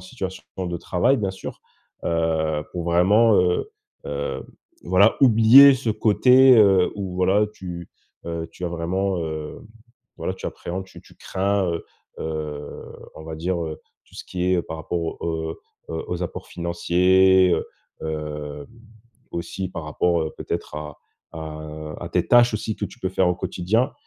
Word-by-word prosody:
situation 95 0 -6 0.2
de 85 -2 -2
travail 90 +10 +1
bien 100 -3 -1
sûr. 95 - -8 0.4
Heu, 80 -2 0
pour 85 -2 -4
vraiment, 100 +6 +4
heu 90 0 0 0.4
heu, 70 0 -4 0.4
voilà 95 +5 +4
oublier 130 +4 +8
ce 120 -3 -2
côté, 125 +5 +5
heu, 95 -4 +5
où 95 -3 -5
voilà 95 +3 +3
tu 85 -3 -8 0.4
heu, 85 -1 -4
tu 90 - -7
as - - 0
vraiment, 90 +3 -1
heu, 80 -1 -5 0.6
voilà, - - -3
tu - - -7
appréhendes 95 +2 -5
tu - - -14
tu - - -19
crains, 100 0 -1
heu, 85 - -4 0.4
heu 75 -2 -5 0.3
on 80 - -11
va 80 -1 -6
dire, 85 +1 -2
heu, 80 -1 -6 0.3
tout - - -22
ce - - -8
qui 90 -1 -4
est - - +3
heu - - 0
par 80 - -7
rapport 85 +2 -3 0.2
aux, 80 -1 -2 0.4
heu, 80 0 -4
aux 90 0 -2
apports 85 - -6
financiers, 90 +2 +3
heu 85 - 0 0.4
hem, 75 -2 -5 0.7
aussi 95 +2 -4
par 80 -3 -6
rapport, 85 +2 +1
heu, 80 - -4
peut-être - - -5
à 75 -1 -7 0.3
à 75 -1 -7
à - - -5
tes - - 0
tâches 120 -1 +6
aussi 110 0 -3
que 105 - -3
tu - - -15
peux 95 - -1
faire 95 -1 +2
au 90 - +1
quotidien 105 +8 0
90 Hz, 165 wpm, -23 LUFS, 80-95 Hz, 0.7 s, oublier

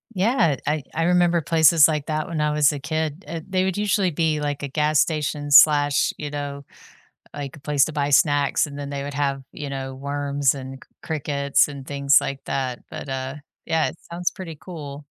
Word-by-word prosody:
Yeah, 190 - +2
I 150 +1 0
I 165 - 0
remember 175 0 +3
places 160 -1 +5
like 150 -3 -2
that 155 -1 -2
when 165 -2 -3
I 150 0 +1
was 150 -1 +4
a 145 - -5
kid, 155 +3 -3
uh, 165 +1 -5
they 185 -1 0
would 190 0 -1
usually 205 -2 +1
be 155 -1 0
like 145 -1 -3
a - - -2
gas 150 +2 +1
station 150 -2 -1
slash, 145 -1 +6
you 145 -1 -5
know, 140 -1 -5 0.7
like 140 -1 -6
a - - -14
place 145 -1 +2
to 155 - -6
buy 145 -1 -1
snacks, 145 0 +3
and 145 -1 -9
then 140 - -5
they 140 -1 -4
would 140 0 -6
have, 140 -1 -1
you 145 - -6
know, 135 -1 -5
worms 140 0 -1
and 135 -1 -7
c - - -34
crickets, 140 -3 +1
and 140 -2 -9
things 140 -1 +4
like 135 0 -4
that, 130 -2 -3
but, - - -8
uh, 130 0 -4 0.3
yeah, 160 -1 +1
it - - -9
sounds 175 +1 -1
pretty 175 -5 -8
cool. 145 -5 -8
145 Hz, 205 wpm, -23 LUFS, 140-160 Hz, 0.7 s, slash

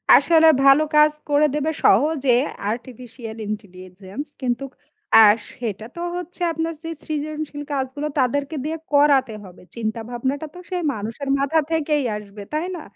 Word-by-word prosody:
আসলে 320 -1 +5 0.2
ভালো 275 +2 +6
কাজ 300 0 +6 0.2
করে 290 +1 +4
দেবে 300 +2 0
সহজে 275 +3 +4 0.4
আর্টিফিশিয়াল 235 -1 -8
ইন্টেলিজেন্স। 190 +3 -7 0.2
কিন্তু 245 0 -1 0.6
আ - - +9 0.3
সেটা 220 -3 -4
তো 340 - -6
হচ্ছে 355 0 -5
আপনার 325 +1 -2
সেই 330 0 -5
সৃজনশীল 305 -1 -4
কাজগুলো 275 +2 -2
তাদেরকে 280 +4 0
দিয়ে 320 +1 -2 0.2
করাতে 280 -4 +4
হবে। 185 -2 -14
চিন্তাভাবনাটা 240 +6 -3
তো - - -9
সেই 360 -1 -2
মানুষের 225 +6 -5
মাথা 280 +4 +2
থেকেই 300 -2 +1
আসবে। 205 0 -10
তাই 310 +3 -1
না? 340 - -7
275 Hz, 140 wpm, -22 LUFS, 225-305 Hz, 0.6 s, আ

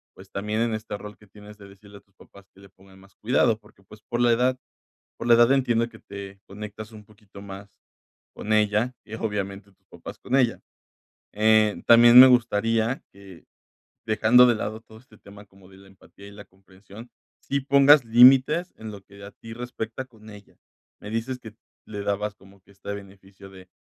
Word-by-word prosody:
pues, - - -17
también 105 +3 -3
en 115 -1 -1
este 110 -1 -6
rol 105 0 -11
que 105 - -21
tienes 105 +1 -16
de 100 -1 -14
decirle 100 +1 -17
a - - -18
tus 100 - -41
papás 100 0 -19
que 95 - -22
le 100 0 -17
pongan 95 0 -21
más 100 0 -22
cuidado, 115 -1 +1
porque, 105 -2 -24
pues, 105 +2 -17
por 120 +2 -5
la 120 -1 +3
edad 125 +2 0 0.6
por - - -7
la 120 - +7
edad 120 +1 +4
entiendo 120 -4 0
que - - -17
te 100 -1 -11
conectas 105 +2 -10
un 105 -1 -14
poquito 105 -1 -17
más 100 0 -12 0.6
con 110 - -4
ella 105 +3 +1
y, 110 - -10
obviamente, 100 -2 -5
tus - - -45
papás - - -12
con 130 - -3
ella. 125 -4 +1 0.7
Eh, 110 0 +2
también 120 +1 +8
me 130 - +10
gustaría 115 0 0
que, 95 -3 -16 0.6
dejando 110 +3 +4
de 120 - +2
lado 110 0 -5
todo 110 -1 -18
este 115 -3 -22
tema 100 +1 -16
como 95 -1 -22
de 95 - -18
la 95 0 -18
empatía 100 +1 -18
y 100 - -13
la 100 0 -13
comprensión, 95 +4 -17 0.3
sí 140 - -3
pongas 140 0 +4
límites 130 +9 +4
en 110 -1 -9
lo 100 -1 -11
que 100 +1 -18
a 100 - -11
ti 115 0 -13
respecta 120 +1 -7
con 110 -4 -18
ella. 105 -1 -15 0.5
Me 105 - -9
dices 115 +4 -4
que 110 -3 -13 0.3
le 105 -1 -8
dabas 100 +1 -3
como 95 -1 -21
que 100 - -24
este 100 +1 -8
beneficio 100 -1 -13
de 95 -1 -16
105 Hz, 200 wpm, -24 LUFS, 100-115 Hz, 0.7 s, me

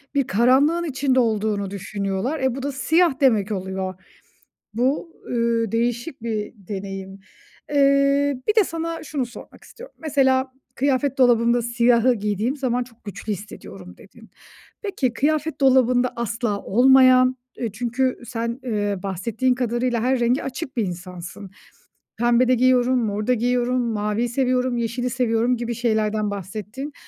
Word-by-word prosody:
bir 275 -3 +1
karanlığın 265 - +3
içinde 270 -4 +1
olduğunu 215 -4 0
düşünüyorlar. 200 - -3
Eee, 260 -2 0
bu 265 - -6
da 285 - -2
siyah 320 +2 +2
demek 220 -6 +3
oluyor. 190 -1 -3 0.8
Bu, 275 +8 0 0.2
ııı, 230 -2 0
değişik 240 +3 -2
bir 220 -3 -3
deneyim. 195 -1 -7 0.5
Eee, 280 0 +3
bir 425 - +3
de 435 - +6
sana 330 -1 -4
şunu 285 -4 -3
sormak 240 - -13
istiyorum. - - -13
Mesela 265 -4 +1 0.2
kıyafet 275 0 0
dolabımda 240 -1 +4
siyahı 235 +1 +3
giydiğim 210 +5 -1
zaman 250 -3 -1
çok 235 -1 -21
güçlü 205 +1 -5
hissediyorum 100 - -9
dedin. 225 +3 -17 0.5
Peki, 290 - -1
kıyafet 300 +2 -1
dolabında 255 -2 +3
asla 230 -3 -2
olmayan, 255 +2 +5 0.2
eee, 230 -4 -3
çünkü 245 +4 -1
sen, 235 +2 -4
eee, 205 -4 -1
bahsettiğin 225 +7 -1
kadarıyla 240 -1 -1
her 255 +1 +1
renge 240 +3 +1
açık 270 +1 -6
bir 230 - +1
insansın. 180 +2 -8 0.7
Pembe 240 +2 +3
de 255 - +4
giyiyorum, 255 0 +3
mor 210 0 -3
da 250 - +4
giyiyorum, 245 +1 +1
maviyi 220 0 -1
seviyorum, 255 0 0
yeşili 235 +2 -2
seviyorum 240 0 +1
gibi 235 0 -3
şeylerden 215 -2 0
bahsettin. 210 - -6
240 Hz, 135 wpm, -22 LUFS, 215-260 Hz, 0.8 s, de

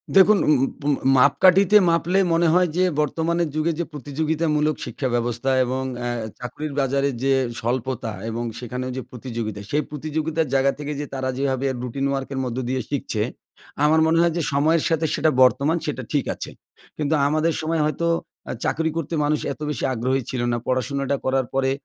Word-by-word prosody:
দেখুন, 200 +2 +7
উন 155 - +6
উন - - +1
পুন 145 0 +1 0.2
মাপকাঠিতে 185 +9 +5
মাপলে 170 +3 +1 0.2
মনে 170 +1 +3
হয় 180 0 +4
যে, 185 - +4 0.2
বর্তমানের 165 +3 0
যুগে 155 +2 +1
যে 170 - 0
প্রতিযোগিতামূলক 150 +2 0
শিক্ষা 130 +2 -3
ব্যবস্থা 120 +2 -1 0.2
এবং 130 +2 -2 0.2
এহ 120 -1 -2 0.2
চাকরির 140 +4 -5
বাজারের 140 0 +1
যে 135 - +2 0.3
স্বল্পতা 120 0 -2 0.2
এবং 115 +1 -3 0.2
সেখানে 125 +1 -5
যে 130 - -2
প্রতিযোগিতা, 115 -4 -5
সেই 150 +1 +1
প্রতিযোগিতার 155 +2 -2
জায়গা 135 0 +3
থেকে 145 0 -4
যে 145 - -3
তারা 130 -1 -2
যেভাবে 135 -1 0 0.2
রুটিন 130 +2 -3
ওয়ার্কের 135 0 -3
মধ্য 125 0 -4
দিয়ে 130 0 0
শিখছে। 125 -6 -2 0.6
আমার 160 +1 +4
মনে 160 +1 +3
হয় 170 -1 +3
যে, - - +1
সময়ের 155 +3 +3
সাথে 165 -1 +1
সেটা 155 +1 +2
বর্তমান 140 +6 +3
সেটা 145 -4 -3
ঠিক 145 -3 +1
আছে। - - -7 0.5
কিন্তু 150 0 0
আমাদের 155 +3 +1
সময় 160 0 0
হয়তো 155 +3 -1 0.4
অ্যা - - -4
চাকরি 160 +1 0
করতে 165 0 -3
মানুষ 150 0 +1
এত 145 - -18
বেশি 145 -6 -3
আগ্রহী 130 +3 0
ছিল 125 - -2
না। 120 - 0
পড়াশোনাটা 140 +2 0
করার 130 -1 +1
পরে 135 0 +1
140 Hz, 175 wpm, -23 LUFS, 130-160 Hz, 0.6 s, দেখুন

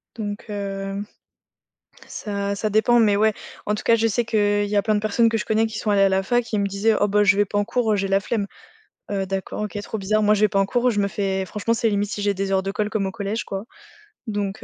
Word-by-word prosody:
Donc 205 -2 -5
hem, 195 0 -4 1.0
ça 200 -1 -3
ça 215 +2 -1
dépend, 220 +3 +4
mais 210 -3 +4
ouais, 215 +1 +3 0.3
en 210 - 0
tout - - -6
cas, 230 - +5
je 225 0 +2
sais 230 +2 0
qu'il 205 -2 +2
y 205 +1 -3
a 205 - +4
plein 215 +1 +1
de - - +2
personnes 215 +2 +2
que 225 - 0
je 210 - -3
connais 220 +1 +2
qui 220 0 -6
sont 215 - -2
allées 200 -1 +3
à 195 - +5
la 190 0 +2
fac 240 +5 +1
et 220 -2 -2
ils - - +1
me 200 - +1
disaient: 200 +3 +1
«Oh 205 - +3
bah, 210 +1 +3
je 195 -1 +4
vais 205 - +4
pas 205 - -3
en 205 - +3
cours, 230 -1 +1
heu, - - +3
j'ai 195 -1 -1
la 195 0 +3
flemme». 205 +1 -2 0.7
Heu, 195 -1 -1
d'accord, 195 +2 -4
OK, 210 0 -4
trop 220 - -5
bizarre. 215 +2 +1
Moi, 210 0 +4
je 205 - -1
vais 215 - +6
pas 200 -1 0
en 195 - +2
cours, 245 +4 +1
je 205 -3 0
me 200 - +1
fais 195 -1 -1
franchement, 210 +4 -2
c'est 230 0 +1
limite 205 -1 0
si 210 - -4
j'ai 200 0 +1
des 195 0 -2
heures 190 0 +2
de 195 +1 -3
colle 210 +1 -1
comme 205 -3 -1
au - - -2
collège, 205 +3 -3
quoi. 195 +1 -5 0.6
Donc 205 -2 -3
205 Hz, 285 wpm, -23 LUFS, 200-215 Hz, 1.0 s, vais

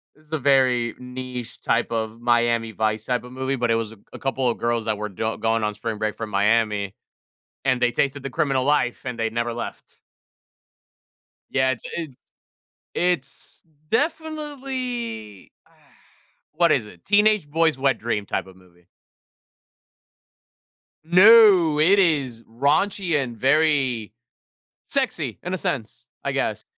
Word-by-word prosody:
it - - -30
was 155 0 -16
a 155 - 0
very 130 -3 +3
niche 125 -1 -7
type 115 - 0
of 110 0 -3
Miami 120 -1 +1
Vice 110 0 -1
type 125 -1 -1
of 125 - -11
movie, 130 +1 -2
but 120 -2 0
it - - +3
was 115 -1 -2
a - - -16 0.2
a - - -8
couple 135 -2 0
of 115 - -2
girls 120 -1 -1
that 110 -2 -1
were 105 0 -4
don 110 +4 -3
going 115 0 +1
on 105 0 0
spring 110 0 -4
break 110 -1 -2
from 110 -1 -5
Miami, 105 -1 +1 0.7
and 130 -2 +2
they 120 - +3
tasted 140 +3 -1
the 135 - -4
criminal 135 0 0
life 135 -3 +1
and 125 -2 -4
they 115 0 0
never 120 +1 -2
left. 120 - -8 1.5
Yeah, 130 -1 +2
it's 125 - -4
it's 155 -7 -6 0.8
it's 175 -7 -2 0.3
definitely 265 - -3
ah, - - -28 0.8
what 170 0 +3
is 115 -6 +1
it? 90 -5 -16
Teenage 210 -5 +3
boys' 160 -1 +2
wet 135 -3 +2
dream 105 -3 -2
type - - -2
of 95 -1 -15
movie. 90 -2 -23 2.2
No, 185 -3 +7
it 185 +7 +5
is 140 -10 +1
raunchy 155 - +1
and 120 -3 -6
very 135 -5 +2 0.8
sexy 205 - -1
in 180 - -4
a 185 - 0
sense, 115 -9 -4 0.2
I - - -1
guess, - - -2
130 Hz, 150 wpm, -23 LUFS, 115-155 Hz, 2.2 s, No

